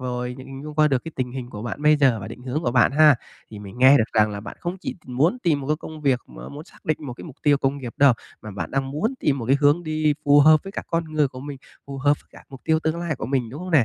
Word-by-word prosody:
rồi 125 Hz, -1 st, -4 dB
hình 135 Hz, +1 st, -9 dB
dung 150 Hz, 0 st, -8 dB
qua 155 Hz, -1 st, +4 dB
được 135 Hz, -1 st, 0 dB
cái 165 Hz, -, -7 dB
tình 125 Hz, -1 st, -3 dB
hình 125 Hz, -2 st, -6 dB
của 105 Hz, -1 st, -7 dB
bạn 120 Hz, +4 st, -5 dB
bây 150 Hz, 0 st, +5 dB
giờ 130 Hz, -6 st, +3 dB
và 95 Hz, -, -7 dB
định 125 Hz, -, -10 dB
hướng 135 Hz, +5 st, -3 dB
của 120 Hz, -, 0 dB
bạn 125 Hz, +2 st, +4 dB
ha. 150 Hz, 0 st, +6 dB, 0.4 s
Thì 105 Hz, -, -9 dB
mình 100 Hz, +3 st, -10 dB
nghe 130 Hz, +2 st, +7 dB
được 110 Hz, -, +3 dB
rằng 105 Hz, -1 st, +3 dB
là 100 Hz, 0 st, -5 dB
bạn -, -, -9 dB
không 175 Hz, +1 st, -4 dB
chỉ -, -, -5 dB
muốn 145 Hz, -, +1 dB
tìm 160 Hz, -, +1 dB
một 135 Hz, -, -7 dB
cái 150 Hz, -, +1 dB
công 155 Hz, 0 st, -10 dB
việc 135 Hz, -4 st, +1 dB
mà -, -, -11 dB
muốn 145 Hz, +2 st, -9 dB
xác -, -, -21 dB
định 155 Hz, -, 0 dB
một 140 Hz, -5 st, -7 dB
cái -, -, -11 dB
mục 150 Hz, -6 st, -11 dB
tiêu 145 Hz, -1 st, +4 dB
công 135 Hz, +1 st, -1 dB
nghiệp 125 Hz, -3 st, -7 dB
đâu, 140 Hz, -2 st, +6 dB, 0.3 s
mà 110 Hz, -, -8 dB
bạn 95 Hz, -4 st, -5 dB
đang 135 Hz, 0 st, -2 dB
muốn 200 Hz, -, -1 dB
tìm 140 Hz, -2 st, +1 dB
một 115 Hz, -, -5 dB
cái 135 Hz, +2 st, +4 dB
hướng 145 Hz, +4 st, +4 dB
đi 155 Hz, -2 st, 0 dB
phù 145 Hz, 0 st, +6 dB
hợp 155 Hz, +1 st, +6 dB
với 195 Hz, -, -8 dB
cả -, -, -4 dB
con 165 Hz, -1 st, 0 dB
người 150 Hz, -3 st, +2 dB
của 130 Hz, -1 st, -10 dB
mình, 140 Hz, -1 st, -7 dB, 0.3 s
phù 140 Hz, -1 st, -7 dB
hợp 145 Hz, +2 st, +3 dB
với -, -, -36 dB
cả -, -, -15 dB
mục 135 Hz, -2 st, -12 dB
tiêu 160 Hz, -1 st, +2 dB
tương 160 Hz, +1 st, -1 dB
lai 170 Hz, -5 st, -2 dB
của 110 Hz, -, -5 dB
mình, 125 Hz, -3 st, -1 dB
đúng 145 Hz, +7 st, -8 dB
không 185 Hz, -, -6 dB
nè? 145 Hz, -8 st, +5 dB
140 Hz, 320 wpm, -23 LUFS, 125-155 Hz, 0.4 s, nghe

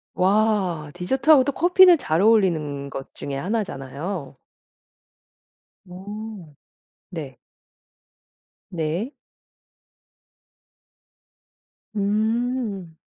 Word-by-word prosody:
와. 190 Hz, -5 st, +1 dB
디저트하고 265 Hz, -, +4 dB
또 285 Hz, -, -1 dB
커피는 360 Hz, +3 st, +6 dB
잘 165 Hz, -, 0 dB
어울리는 160 Hz, -10 st, +2 dB
것 135 Hz, -1 st, -8 dB
중에 140 Hz, -, -6 dB
하나잖아요. 155 Hz, -, -4 dB, 1.5 s
오 195 Hz, -2 st, -9 dB, 0.5 s
네. 150 Hz, -8 st, -7 dB, 1.3 s
네. 170 Hz, -, -2 dB, 2.8 s
음. 215 Hz, -3 st, -1 dB
195 Hz, 125 characters per minute, -23 LUFS, 155-225 Hz, 2.8 s, 커피는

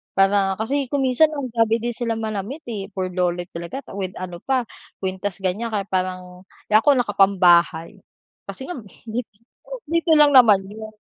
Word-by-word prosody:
para 195 Hz, 0 st, +3 dB
kasi 270 Hz, +6 st, -2 dB
kung 280 Hz, +1 st, -1 dB
minsan 260 Hz, +5 st, +4 dB
ang 265 Hz, -4 st, -4 dB
grabe 225 Hz, -1 st, +2 dB
din 235 Hz, +1 st, -2 dB
sila 230 Hz, -1 st, -3 dB
manamit, 220 Hz, +7 st, -5 dB
eh, 195 Hz, -3 st, -5 dB
burloloy 180 Hz, -1 st, -1 dB
talaga 170 Hz, +11 st, -7 dB, 0.2 s
with 185 Hz, -1 st, -4 dB
ano 180 Hz, -1 st, -7 dB
pa 260 Hz, +2 st, 0 dB, 0.4 s
kwintas, 190 Hz, 0 st, -4 dB
ganyan 200 Hz, +6 st, -1 dB
kaya 205 Hz, -2 st, -1 dB
parang 185 Hz, -1 st, -4 dB, 0.2 s
eh, -, -, +4 dB
ako 280 Hz, +5 st, +4 dB
nakapambahay 195 Hz, -5 st, +3 dB, 0.5 s
kasi 195 Hz, +6 st, -7 dB
ngam 275 Hz, -11 st, -7 dB, 0.2 s
di 230 Hz, +1 st, -4 dB, 0.7 s
dito 335 Hz, 0 st, +1 dB
lang 295 Hz, -1 st, +6 dB
naman 220 Hz, -7 st, +6 dB
'yon. 215 Hz, +2 st, -10 dB
205 Hz, 155 wpm, -22 LUFS, 185-245 Hz, 0.7 s, lang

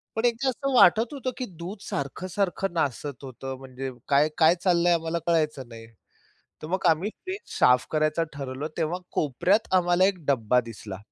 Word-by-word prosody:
पण 225 Hz, -, 0 dB
एकदा 240 Hz, +3 st, +1 dB
असं 275 Hz, +2 st, -2 dB
वाटत 225 Hz, +5 st, +5 dB
होतं, 260 Hz, -2 st, -3 dB
की 255 Hz, -, -3 dB
दूध 185 Hz, +5 st, -6 dB
सारखं-सारखं 185 Hz, +6 st, -2 dB
नासत 140 Hz, -3 st, -2 dB
होतं, 130 Hz, 0 st, -7 dB
म्हणजे 130 Hz, 0 st, -6 dB, 0.2 s
काय 145 Hz, +2 st, +4 dB
काय 165 Hz, +2 st, +5 dB
चाललंय 175 Hz, -1 st, +3 dB
आम्हाला 165 Hz, 0 st, -1 dB
कळायचं 150 Hz, -6 st, +1 dB
नाही. 115 Hz, -1 st, -11 dB, 0.7 s
तर 155 Hz, -, -6 dB
मग 190 Hz, +1 st, -2 dB
आम्ही 170 Hz, +6 st, +1 dB, 0.2 s
फ्रीज 375 Hz, +2 st, -4 dB, 0.2 s
साफ 125 Hz, 0 st, +5 dB
करायचं 155 Hz, +1 st, +1 dB
ठरवलं. 140 Hz, +1 st, -5 dB
तेव्हा 165 Hz, +2 st, -1 dB
कोपऱ्यात 175 Hz, -, +1 dB
आम्हाला 175 Hz, 0 st, +4 dB
1 185 Hz, -5 st, -1 dB
डब्बा 125 Hz, -3 st, +2 dB
दिसला. 110 Hz, -4 st, -8 dB
165 Hz, 160 wpm, -26 LUFS, 135-190 Hz, 0.7 s, वाटत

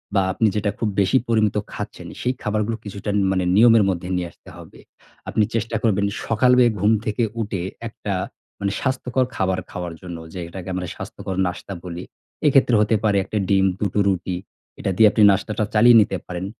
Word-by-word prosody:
বা 100 Hz, -, +4 dB
আপনি 110 Hz, -, +2 dB
যেটা 105 Hz, -1 st, 0 dB
খুব 110 Hz, -, 0 dB
বেশি 100 Hz, +7 st, +3 dB
পরিমিত 110 Hz, -3 st, +2 dB, 0.2 s
খাচ্ছেন, -, -, -7 dB
সেই 125 Hz, -, 0 dB
খাবারগুলো 105 Hz, +1 st, -1 dB
কিছুটা 100 Hz, +1 st, -6 dB
ন -, -, +3 dB
মানে 95 Hz, -1 st, 0 dB
নিয়মের 115 Hz, 0 st, +6 dB
মধ্যে 90 Hz, -1 st, -3 dB
নিয়ে 90 Hz, -1 st, -2 dB
আসতে -, -, -18 dB
হবে। -, -, -13 dB, 0.5 s
আপনি 110 Hz, -, +2 dB
চেষ্টা 115 Hz, 0 st, -1 dB
করবেন, 100 Hz, -3 st, +2 dB, 0.2 s
সকালে 125 Hz, +2 st, +4 dB
ঘুম 105 Hz, +3 st, +3 dB
থেকে 110 Hz, +2 st, 0 dB, 0.2 s
উঠে, 100 Hz, -5 st, -3 dB, 0.2 s
একটা 105 Hz, -2 st, -5 dB, 0.5 s
মানে 100 Hz, 0 st, -1 dB
স্বাস্থ্যকর 130 Hz, -1 st, 0 dB
খাবার 95 Hz, -1 st, 0 dB
খাওয়ার 90 Hz, -1 st, -5 dB
জন্য, 90 Hz, -2 st, -7 dB, 0.2 s
যেটাকে 90 Hz, +1 st, -7 dB
আমরা 90 Hz, -1 st, -3 dB
স্বাস্থ্যকর 95 Hz, -, -6 dB
নাস্তা 90 Hz, +2 st, -6 dB
বলি। 90 Hz, 0 st, -6 dB, 0.4 s
এক্ষেত্রে 135 Hz, -4 st, +4 dB
হতে 105 Hz, +1 st, +2 dB
পারে 105 Hz, -2 st, +3 dB
১ -, -, -16 dB
টা 105 Hz, -, +1 dB
ডিম, 95 Hz, -1 st, +4 dB
২ -, -, -1 dB
টো -, -, +1 dB
রুটি। 95 Hz, -1 st, -1 dB, 0.4 s
এটা -, -, -1 dB
দিয়ে 110 Hz, -1 st, +7 dB
আপনি 110 Hz, -, +1 dB
নাস্তাটা 105 Hz, +2 st, -1 dB
চালিয়ে 120 Hz, +2 st, +7 dB
নিতে 100 Hz, -2 st, 0 dB
পারেন। 90 Hz, +1 st, -4 dB
105 Hz, 185 wpm, -22 LUFS, 95-115 Hz, 0.5 s, দিয়ে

